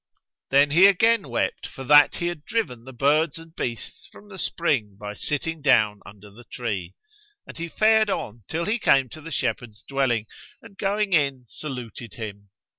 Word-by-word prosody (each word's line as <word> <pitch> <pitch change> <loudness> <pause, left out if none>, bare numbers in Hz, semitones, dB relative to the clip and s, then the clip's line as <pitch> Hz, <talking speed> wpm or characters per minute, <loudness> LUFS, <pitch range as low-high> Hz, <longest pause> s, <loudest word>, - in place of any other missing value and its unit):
Then 140 +1 +4
he 175 +6 +7
again 205 - +3
wept 120 - -2
for 135 - -9
that 145 +2 +6
he 170 - -3
had 175 -4 -3
driven 140 - -3
the 130 - -9
birds 145 +5 +2
and 165 0 -13
beasts 120 -2 -5
from 205 - -16
the 190 -2 -9
spring 120 - -1
by 105 0 -6
sitting 150 +7 -3
down 110 -7 +3
under 100 0 -14
the 115 +5 -15
tree, 100 -9 -5 0.5
and - - -11
he 170 0 -5
fared 220 +3 +3
on 115 - -4
till 170 +1 -2
he 225 +4 0
came 135 - +3
to 155 - -10
the 165 - -9
shepherd's 120 -6 -3
dwelling 130 -5 0 0.3
and 215 -3 -15
going 200 0 0
in, 140 -5 +1
saluted 125 -4 -8
him. 100 -3 -8
140 Hz, 180 wpm, -24 LUFS, 115-170 Hz, 0.5 s, he